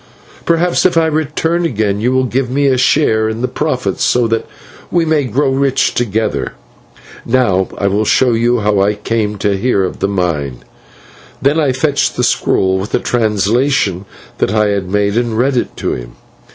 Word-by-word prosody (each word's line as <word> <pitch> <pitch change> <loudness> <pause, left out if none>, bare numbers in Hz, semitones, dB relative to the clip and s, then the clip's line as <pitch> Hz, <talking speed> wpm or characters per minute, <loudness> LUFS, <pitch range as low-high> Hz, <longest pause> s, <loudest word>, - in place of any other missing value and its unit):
Perhaps, 170 +1 +2
if 180 -2 +2
I 165 - +4
return 160 +2 -1
again, 105 -9 -1
you 125 +3 +1
will 130 0 +2
give 130 0 -1
me 140 +3 0
a 135 -2 +3
share 125 -4 +2
in 110 +1 -4
the 125 - 0
profits, 125 -12 -2
so 125 -1 +2
that 115 0 -1 0.4
we 170 -1 +1
may 155 -3 +1
grow 135 +3 0
rich 135 0 +1
together. 110 - -1 0.7
And 115 - -7
now 95 -8 +2
I 100 - -2
will 100 +2 +1
show 125 +3 +3
you 120 +1 +1
how 105 -1 +1
I 105 +2 +2
came 105 0 -2
to 100 0 0
hear 100 -1 +1
of 90 - -4
the - - 0
mine." 80 -10 -2 0.8
And 145 +4 +3
I 140 -3 +2
fetched 140 +2 0
the 125 - -1
scroll, 95 -5 +1
with 100 - -6
the - - +2
translation 110 -2 0 0.3
which - - +1
I 105 -1 +2
had 100 -2 -2
made, 100 +2 0
and 120 -2 -1
read 130 +3 +1
it 120 - -2
to - - -2
him. - - -7
115 Hz, 190 wpm, -15 LUFS, 100-135 Hz, 0.8 s, I